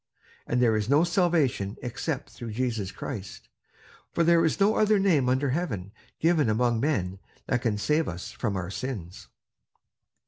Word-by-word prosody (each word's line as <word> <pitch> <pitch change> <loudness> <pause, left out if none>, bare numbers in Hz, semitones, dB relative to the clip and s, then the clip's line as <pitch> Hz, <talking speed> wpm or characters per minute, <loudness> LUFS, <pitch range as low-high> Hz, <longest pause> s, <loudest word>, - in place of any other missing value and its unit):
And 120 - +1
there 115 -3 +4
is 110 +1 -1
no 145 +4 +5
salvation 165 - +1
except 125 +4 -4
through 115 -3 -7
Jesus 115 -5 -2
Christ, 100 -7 -7 0.6
for 170 - +1
there 170 0 +5
is 160 - +1
no 200 +2 +4
other 215 0 +4
name 165 -10 +3
under 130 +1 +1
heaven 105 - -3 0.3
given 160 -6 +3
among 120 +1 +2
men 95 -9 -1 0.3
that 125 -2 0
can 110 -4 0
save 150 +9 +1
us 90 +6 -6
from 110 -3 -2
our 95 -1 -3
sins." 100 -7 -6
125 Hz, 160 wpm, -27 LUFS, 105-160 Hz, 0.6 s, no